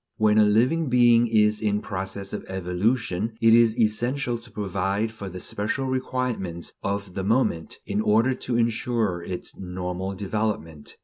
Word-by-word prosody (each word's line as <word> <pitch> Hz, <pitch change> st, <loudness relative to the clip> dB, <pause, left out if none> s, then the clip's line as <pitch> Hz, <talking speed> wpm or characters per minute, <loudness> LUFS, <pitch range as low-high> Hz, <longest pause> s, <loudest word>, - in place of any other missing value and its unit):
When 110 Hz, 0 st, +4 dB
a 105 Hz, -, +6 dB
living 130 Hz, +9 st, +2 dB
being 120 Hz, -1 st, +5 dB
is 105 Hz, -1 st, +3 dB
in 105 Hz, -1 st, +1 dB
process 95 Hz, 0 st, -5 dB
of -, -, -4 dB
evolution, 95 Hz, +3 st, -1 dB
it 115 Hz, -1 st, +5 dB
is 115 Hz, -1 st, +5 dB
essential 120 Hz, +3 st, 0 dB
to 115 Hz, +1 st, -15 dB
provide 100 Hz, +1 st, -1 dB
for 100 Hz, -3 st, -7 dB
the 90 Hz, 0 st, -7 dB
special 105 Hz, +9 st, -2 dB
requirements 125 Hz, -9 st, -3 dB
of 100 Hz, -1 st, -3 dB
the 95 Hz, -, -3 dB
moment, 100 Hz, -6 st, 0 dB
in 100 Hz, +1 st, -1 dB
order 115 Hz, +5 st, +3 dB
to 125 Hz, -1 st, -2 dB
ensure 115 Hz, -5 st, 0 dB
its 90 Hz, +1 st, -5 dB
normal 90 Hz, +1 st, -4 dB
development. 100 Hz, -6 st, -3 dB
105 Hz, 150 wpm, -25 LUFS, 95-115 Hz, -, a